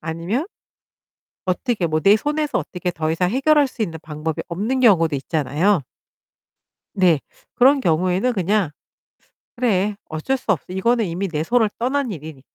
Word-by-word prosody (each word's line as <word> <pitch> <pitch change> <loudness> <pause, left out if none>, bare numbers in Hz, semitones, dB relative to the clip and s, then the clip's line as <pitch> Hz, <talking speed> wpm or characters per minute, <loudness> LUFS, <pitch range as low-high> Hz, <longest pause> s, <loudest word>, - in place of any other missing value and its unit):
아니면 170 - -3 1.0
어떻게 185 0 0
뭐 155 0 0
내 200 +1 +6
손에서 295 +5 -1
어떻게 180 -1 -4
더 160 -2 -2
이상 180 +2 +1
해결할 280 +4 +3
수 255 - -8
있는 165 -6 -3
방법이 155 0 -4
없는 210 +10 -2
경우도 170 - +4
있잖아요. 155 +5 +1 1.1
네. 180 -6 +4 0.4
그런 270 +3 +5
경우에는 185 +4 +1
그냥 195 -2 +1 0.9
'그래 210 -4 +1
어쩔 160 +13 -2
수 240 - -1
없지. 180 0 -3
이거는 230 +3 +1
이미 180 +3 -3
내 155 -3 -2
손를 225 +4 +2
떠난 260 +1 -1
일이니까' 155 -5 -8
190 Hz, 310 characters per minute, -21 LUFS, 165-240 Hz, 1.1 s, 내